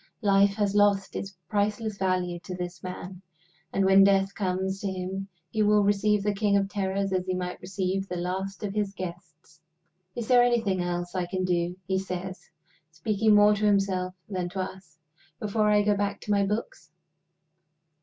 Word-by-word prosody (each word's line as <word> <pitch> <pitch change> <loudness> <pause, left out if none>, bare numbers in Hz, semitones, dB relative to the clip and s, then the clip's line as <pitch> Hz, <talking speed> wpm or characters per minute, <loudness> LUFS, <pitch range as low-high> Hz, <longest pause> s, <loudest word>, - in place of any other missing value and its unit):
Life 200 0 +4
has 205 -2 0
lost 205 -2 +3
its 195 -2 -5
priceless 210 +2 -1
value 180 -2 0
to 185 +1 -7
this 175 -1 -6
man; 185 0 -7 0.5
and 195 - +1
when 195 +1 +7
Death 195 0 +3
comes 190 0 -2
to 205 - -2
him 190 +1 -4 0.2
he 220 - 0
will 210 0 +4
receive 205 0 +2
the 210 0 +1
king 200 0 +2
of 195 -1 +1
terrors 195 -1 -1
as 185 0 -1
he 185 - 0
might 180 0 -4
receive 190 +1 -2
the 180 - -3
last 190 +3 -3
of 200 -1 -3
his 205 -2 -2
guests. 165 -3 -9 0.5
"Is 235 -2 -4
there 250 -1 +6
anything 230 -6 +2
else 175 0 -3
I 180 -2 -1
can 185 0 -2
do," 175 -1 0
he 190 -1 0
says, 185 0 -6 0.4
speaking 210 +6 +2
more 205 0 +6
to 210 +1 -2
himself 190 -2 +1
than 185 -3 -3
to 190 +1 -3
us, 185 -4 -8 0.4
"before 210 0 +1
I 210 0 +4
go 205 0 +3
back 200 0 -1
to 210 - -4
my 200 -1 +3
books?" 230 - -4
195 Hz, 180 wpm, -27 LUFS, 185-205 Hz, 0.5 s, when